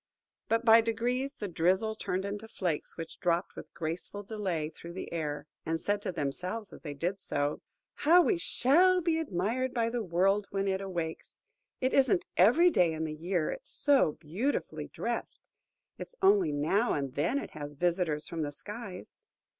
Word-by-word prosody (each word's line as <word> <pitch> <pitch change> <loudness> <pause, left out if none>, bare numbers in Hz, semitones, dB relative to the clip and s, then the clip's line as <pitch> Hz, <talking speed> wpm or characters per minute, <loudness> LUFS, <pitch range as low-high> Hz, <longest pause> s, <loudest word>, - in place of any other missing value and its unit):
But 230 +1 +1
by 225 0 +8
degrees 245 +5 -1
the 205 - -4
drizzle 190 +5 +1
turned 190 -3 -3
into 205 +2 -5
flakes, 175 -8 -3
which 165 -1 -7
dropped 175 +1 0
with - - -9
graceful 170 +5 -4
delay 190 -7 -2
through 170 +2 -10
the 185 - -6
air, 150 -3 -3 0.2
and 165 0 -1
said 205 +4 -1
to - - -2
themselves 180 +7 -4
as - - -11
they 145 -3 -6
did 180 +7 -2
so, 145 -5 -2 0.4
"How 345 +4 +7
we 365 -2 +2
shall 360 +6 +4
be 330 -1 +1
admired 250 - -1
by 230 -1 +1
the 240 0 -1
world 195 +2 +2
when 195 0 -1
it 190 0 0
awakes! 170 -4 -5 0.4
It 260 0 +1
isn't 260 -9 +3
every 300 - +6
day 175 - +3
in 160 0 -3
the 155 -1 -3
year 170 +1 -1
it's - - -8
so 275 - +3
beautifully 190 - -3
drest. - - -4 0.6
It's - - -8
only 390 - +4
now 160 +11 +1
and 140 -3 -2
then 145 - +1
it - - -4
has 145 -1 -7
visitors 170 -1 0
from 165 -1 -4
the 145 -1 -2
skies. 205 +4 -8
190 Hz, 175 wpm, -30 LUFS, 165-235 Hz, 0.6 s, by